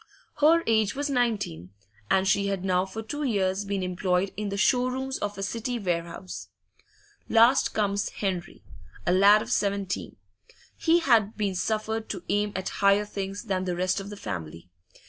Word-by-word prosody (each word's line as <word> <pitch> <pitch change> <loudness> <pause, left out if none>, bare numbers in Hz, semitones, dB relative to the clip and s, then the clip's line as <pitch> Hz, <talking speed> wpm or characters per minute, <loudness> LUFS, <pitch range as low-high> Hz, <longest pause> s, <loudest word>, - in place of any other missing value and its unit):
Her 325 +3 +5
age 220 -2 +2
was 285 +1 -2
nineteen, 205 - -1 0.4
and 190 0 +3
she 200 +1 +2
had 195 -2 -2
now 185 0 +1
for 220 +4 -6
two 290 +7 -5
years 200 -6 0
been 200 -1 -2
employed 180 +1 0
in 210 -1 -3
the 200 - -3
show 250 +5 +3
rooms 265 +1 -3
of 205 -1 -3
a 195 - -4
City 230 +4 -3
warehouse. 175 -2 -4 0.8
Last 235 +4 +4
comes 200 -1 0
Henry, 185 -4 -4 0.4
a - - +2
lad 200 +3 +6
of - - -8
seventeen; 200 -2 -1 0.6
he 340 +1 +3
had 225 -8 +3
been 205 -3 0
suffered 220 +3 -2
to 190 -4 -5
aim 205 +1 +1
at 190 - -2
higher 200 +1 +4
things 200 0 -5
than 190 -4 -2
the 180 -1 -1
rest 185 +2 0
of 195 +1 -7
the 205 - -8
family. 85 - -7
200 Hz, 170 wpm, -27 LUFS, 185-220 Hz, 0.8 s, lad